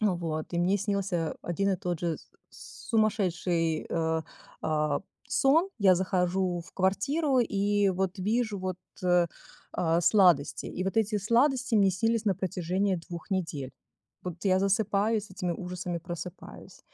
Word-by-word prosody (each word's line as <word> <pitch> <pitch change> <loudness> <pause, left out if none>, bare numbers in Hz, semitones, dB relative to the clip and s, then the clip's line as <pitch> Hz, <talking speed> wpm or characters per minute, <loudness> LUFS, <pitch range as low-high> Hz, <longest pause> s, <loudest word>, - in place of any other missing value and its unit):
Вот 170 -6 -1
и - - +1
мне 190 +4 +2
снился 195 -5 -1
один 195 +3 0
и 190 - +1
тот 175 -2 -3
же 170 -2 -1 0.3
с - - -13
сумасшедший, 180 -7 +1
э, 160 -1 0 0.4
а, 150 -2 0 0.3
сон. 290 +8 +3
Я 190 -2 +6
захожу 180 -1 0
в 170 - -14
квартиру 260 - +1
и 205 -2 +2
вот 190 +1 -2
вижу 215 +1 0
вот, 185 -1 -3 0.3
э, 175 -1 +4 0.5
а, 165 0 +1
сладости, 175 -5 +4
и 185 - -4
вот 195 +3 -2
эти 215 -1 +2
сладости 245 +4 +2
мне 195 -2 +5
снились 225 +4 0
на 195 -3 +2
протяжении 185 +2 -1
2 170 0 -8
недель. 160 -8 -2 0.5
Вот 180 -1 -6
я 185 -1 +4
засыпаю, 205 +2 +2
с 205 - -12
этими 180 -1 -3
ужасами 180 0 -4
просыпаюсь. 175 0 -9
185 Hz, 145 wpm, -29 LUFS, 175-205 Hz, 0.5 s, Я